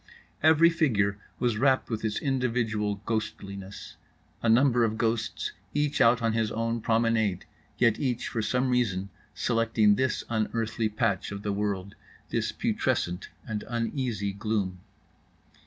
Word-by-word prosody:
Every 160 +2 +6
figure 105 -12 +1 0.2
was 120 -3 0
wrapped 130 -1 +2
with 110 -1 -2
its 110 -1 -1
individual 115 -6 -1
ghostliness; 100 -3 -5 0.4
a 115 - +1
number 120 +1 +5
of 110 -1 0
ghosts 115 -1 -1 0.2
each 145 -1 +1
out 115 +1 +5
on 115 -1 +2
his 110 -1 0
own 115 +1 -1
promenade, 110 -4 +1 0.3
yet 115 -3 +3
each 125 -4 -1
for 115 - -2
some 125 +4 +1
reason 100 -6 0 0.3
selecting 115 -3 +3
this 130 -1 0
unearthly 110 0 -1
patch 100 -3 -1
of 100 0 -6
the 100 - -1
world, 100 -1 -2 0.4
this - - -1
putrescent 90 +2 -1 0.2
and 105 -2 -3
uneasy 115 -3 -2
gloom. 100 -2 -2
110 Hz, 135 wpm, -28 LUFS, 105-120 Hz, 0.4 s, Every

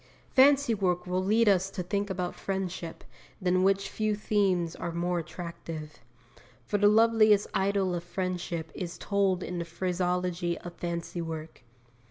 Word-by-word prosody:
Fancy 275 -2 +6
work 180 -4 0
will 180 +1 -1
lead 220 +4 +3
us 190 -1 +4
to 190 -2 -4
think 200 +3 -2
about 180 -2 -2
friendship, 190 -3 -4 0.4
than 185 -1 +2
which 195 +1 +2
few 215 0 -1
themes 190 -5 +1
are 170 - -4
more 175 +1 -1
attractive. 165 -3 -7 0.7
For 205 - 0
the 205 - +6
loveliest 215 -1 +5
idyll 195 -1 +1
of 170 -1 -3
friendship 175 -2 -3
is 175 -2 -5
told 195 -2 +1
in 180 -1 -4
the - - -1
phraseology 180 0 -1
of 175 - -9
fancy 170 0 -4
work. 160 -3 -6
185 Hz, 150 wpm, -29 LUFS, 175-200 Hz, 0.7 s, Fancy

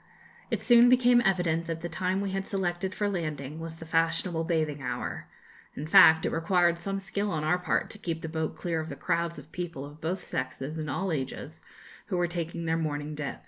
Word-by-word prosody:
It - - -2
soon 240 0 +7
became 245 -1 +5
evident 175 -5 +1
that 165 -1 -3
the 175 - -3
time 185 +3 -1
we 200 -1 -2
had 195 0 -3
selected 185 -1 -1
for 205 - 0
landing 155 -6 -3
was 165 0 -6
the 165 - -10
fashionable 165 +1 +1
bathing 155 -4 0
hour. 125 -2 -4 0.5
In 145 - -5
fact, 160 0 +7
it - - 0
required 170 +1 +2
some 195 +3 -2
skill 200 +1 -2
on 155 -4 -2
our 175 +4 +2
part 180 - 0
to 210 - -8
keep 165 -4 -4
the - - -3
boat 160 -1 -2
clear 170 -2 -2
of 160 0 -5
the - - -5
crowds 170 0 -1
of 145 +2 -12
people 170 -5 -5
of 145 +2 -13
both 175 +4 -3
sexes 135 +4 -4
and 155 -1 -4
all 190 +7 -1
ages, 135 -5 -4 0.5
who 180 - -1
were 175 - +2
taking 170 -1 -4
their 165 0 +1
morning 150 -1 -3
dip. 150 -2 -4
165 Hz, 215 wpm, -28 LUFS, 155-185 Hz, 0.5 s, soon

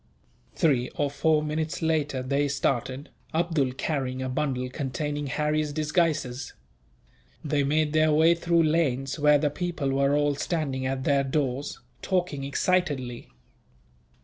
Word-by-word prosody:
Three 130 -6 +2
or 145 -1 0
four 150 +2 +2
minutes 155 +1 -2
later 150 -5 0
they 140 +2 +1
started, 135 0 -1 0.3
Abdool 160 -6 +1
carrying 130 -2 -2
a 130 - -3
bundle 130 -2 -1
containing 145 +2 -3
Harry's 150 +2 0
disguises. 150 -4 -1 0.9
They 145 -1 +1
made 150 +2 +1
their 155 0 +4
way 160 +3 +5
through 170 0 +2
lanes, 145 -3 0
where 150 0 +5
the 145 0 0
people 170 -4 -2
were 140 +1 +2
all 145 0 +2
standing 140 -4 -2
at 130 0 -2
their 140 0 +2
doors, 135 0 -2 0.2
talking 180 -7 -1
excitedly. 140 -5 -1
145 Hz, 130 wpm, -26 LUFS, 135-155 Hz, 0.9 s, way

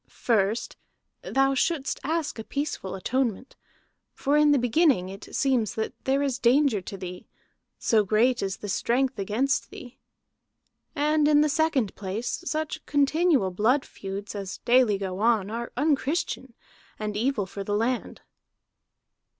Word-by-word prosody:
First 220 -1 0 0.4
thou 270 0 +1
shouldst 285 +1 0
ask 315 -4 -2
a - - -4
peaceful 280 -9 -4
atonement. 250 +4 -2 0.6
For 285 +2 0
in 300 0 +5
the 290 - +5
beginning 245 - +2
it 195 +2 -9
seems 240 -5 +1
that 220 -1 -2
there 275 +1 +2
is 270 -2 -1
danger 250 -3 +3
to 195 +2 -8
thee, 180 -1 -8 0.5
so 220 -2 +2
great 235 +5 +2
is 195 0 -2
the 205 - -7
strength 250 +5 0
against 220 +8 0
thee. 295 -12 -11 1.0
And 300 0 +2
in 295 -1 +5
the 300 - +3
second 290 - +1
place 205 - -4
such 310 0 -3
continual 290 - +2
blood 235 +9 +2
feuds 195 +1 -7
as 200 -2 -5
daily 240 -4 +4
go 190 -1 -4
on 215 -3 +2
are 235 +1 -4
unchristian, 285 -3 -1 0.4
and 210 -1 -4
evil 230 -1 0
for 195 +1 -7
the 205 +1 -1
land." 235 +4 -2
245 Hz, 140 wpm, -26 LUFS, 205-280 Hz, 1.0 s, in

